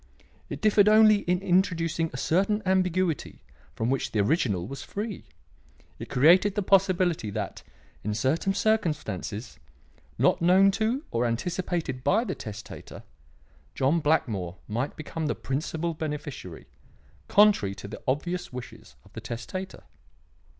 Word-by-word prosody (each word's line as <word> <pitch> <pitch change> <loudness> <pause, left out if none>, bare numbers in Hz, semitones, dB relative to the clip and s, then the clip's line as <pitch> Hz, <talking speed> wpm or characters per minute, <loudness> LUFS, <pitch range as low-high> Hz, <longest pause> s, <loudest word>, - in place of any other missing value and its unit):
It - - -6
differed 210 -1 +5
only 215 0 +7
in 180 +1 +1
introducing 170 -3 +1
a 125 - -6
certain 195 +9 +1
ambiguity 185 -3 0 0.3
from 115 +3 -1
which 135 - -1
the 110 - -1
original 105 - +1
was 135 +6 -7
free. 210 -1 -5 0.7
It - - -7
created 180 +9 +5
the 205 - 0
possibility 185 - +2
that, - - -5 0.4
in 105 0 -2
certain 155 - 0
circumstances, 150 - -1 0.6
not - - +3
known 190 +3 +5
to 225 +8 -1
or 120 +1 +1
anticipated 165 +1 -2
by 220 - +3
the 195 -6 -3
testator, 105 -6 -9 0.7
John 140 +6 +2
Blackmore 105 - 0
might 120 +6 -3
become 155 +1 -4
the - - -1
principal 160 +4 -3
beneficiary, 150 - -6 0.6
contrary 200 - +4
to 100 - -9
the 105 - -9
obvious 175 +7 -2
wishes 125 - -10
of - - -20
the - - -7
testator. 185 +11 -6
165 Hz, 130 wpm, -27 LUFS, 125-190 Hz, 0.7 s, only